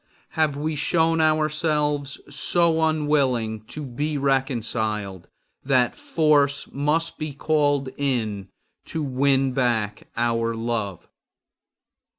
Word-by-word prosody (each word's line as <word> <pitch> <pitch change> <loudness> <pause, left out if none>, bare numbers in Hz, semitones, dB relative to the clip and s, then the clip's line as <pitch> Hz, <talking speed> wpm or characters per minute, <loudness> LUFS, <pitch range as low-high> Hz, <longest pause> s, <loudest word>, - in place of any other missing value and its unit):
Have 155 -3 0
we 155 +2 -2
shown 165 +2 +2
ourselves 155 -2 +1
so 170 -2 +2
unwilling 140 -8 +1
to 150 +5 -7
be 145 +4 -3
reconciled 110 -8 -1 0.4
that 130 -2 +2
force 145 -3 +2
must 150 +4 0
be 155 -2 -4
called 145 -2 +1
in 110 -8 -2 0.4
to 160 - -4
win 135 0 +2
back 115 -5 0
our 115 -1 0
love? 115 -5 -3
140 Hz, 100 wpm, -23 LUFS, 120-155 Hz, 0.4 s, shown